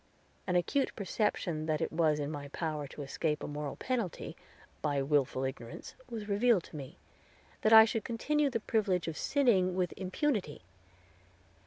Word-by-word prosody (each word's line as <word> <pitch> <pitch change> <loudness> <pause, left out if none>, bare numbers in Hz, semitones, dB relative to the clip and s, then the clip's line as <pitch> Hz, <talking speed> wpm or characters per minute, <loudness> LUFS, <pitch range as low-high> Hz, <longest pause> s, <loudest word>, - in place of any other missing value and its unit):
An 180 - +1
acute 265 +11 +1
perception 185 -6 -1
that 155 -1 +1
it - - -1
was 160 -2 +3
in 145 0 -2
my 145 -2 -5
power 150 -1 -3
to 145 - -8
escape 150 +2 -2
a - - -3
moral 145 -1 -4
penalty, 235 -9 -3 0.5
by 145 -2 0
willful 135 -2 +1
ignorance, 125 -3 -6 0.2
was 220 -3 -5
revealed 210 -1 +3
to - - -13
me, 135 -3 -8 0.6
that 215 - +3
I 220 0 +11
could 225 -1 -2
continue 290 +5 +1
the 230 -4 -2
privilege 200 -6 +1
of 165 - -3
sinning 195 - +2
with 180 -2 0
impunity. 190 - -1
180 Hz, 160 wpm, -32 LUFS, 150-220 Hz, 0.6 s, I